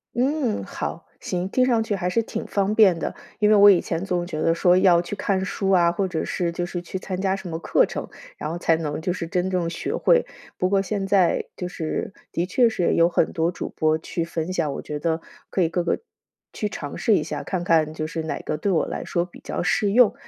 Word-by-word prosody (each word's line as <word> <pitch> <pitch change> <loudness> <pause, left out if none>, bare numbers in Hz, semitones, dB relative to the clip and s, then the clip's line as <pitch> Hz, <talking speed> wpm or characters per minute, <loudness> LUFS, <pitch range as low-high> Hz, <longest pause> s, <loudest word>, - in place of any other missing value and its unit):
嗯， 260 -2 0
好， - - -5 0.2
行， 180 0 -2
听 255 +6 +2
上 240 -3 +2
去 210 - -1
还 180 -2 -1
是 230 +5 +2
挺 230 - -5
方 200 +1 0
便 190 -7 +5
的。 - - -3 0.2
因 210 -1 +4
为 215 - +6
我 205 0 +9
以 185 - +4
前 165 +1 -3
总 180 -2 -1
觉 155 -4 -4
得 165 - +3
说 175 +1 +4
要 180 -2 +5
去 175 +4 -5
看 190 -2 0
书 195 0 -2
啊， 175 -3 +5
或 175 +3 -1
者 170 -4 -2
是， 175 -2 -1
就 175 +1 -3
是 175 0 -4
去 185 +2 -6
参 185 -1 -4
加 190 -1 +1
什 195 -1 -5
么 160 -2 -3
课 - - +3
程， - - -6 0.3
然 150 - -5
后 170 - -3
才 165 -1 +2
能， 155 -2 -3
就 175 +2 -1
是 175 - -4
真 180 +2 -1
正 180 -3 0
学 170 - -3
会， 485 -1 +3 0.3
不 180 - +1
过 195 +1 +2
现 195 0 -2
在， 195 -3 +3
就 180 - -5
是， 165 +2 -4 0.2
的 170 - 0
确 235 +6 +3
是 185 -6 +1
有 170 - +5
很 170 -2 +1
多 165 +1 +1
主 - - -5
播 155 -1 +1
去 165 +1 -3
分 165 +1 -3
享， 165 -6 -1
我 - - -5
觉 150 -1 -5
得 160 +1 -1 0.3
可 190 - 0
以 165 - +3
各 175 +2 0
个 170 - 0 0.5
去 210 - -2
尝 145 -8 -6
试 220 - +3
一 - - +1
下， - - -4
看 185 -3 -3
看 160 -3 +2
就 155 0 -3
是 160 0 -4
哪 160 - -3
个 - - -3
对 200 - -1
我 175 -4 +2
来 - - -5
说 170 - 0
比 175 - -12
较 - - -3
适 200 +2 +1
用。 240 -2 +6
180 Hz, 270 characters per minute, -23 LUFS, 165-195 Hz, 0.5 s, 我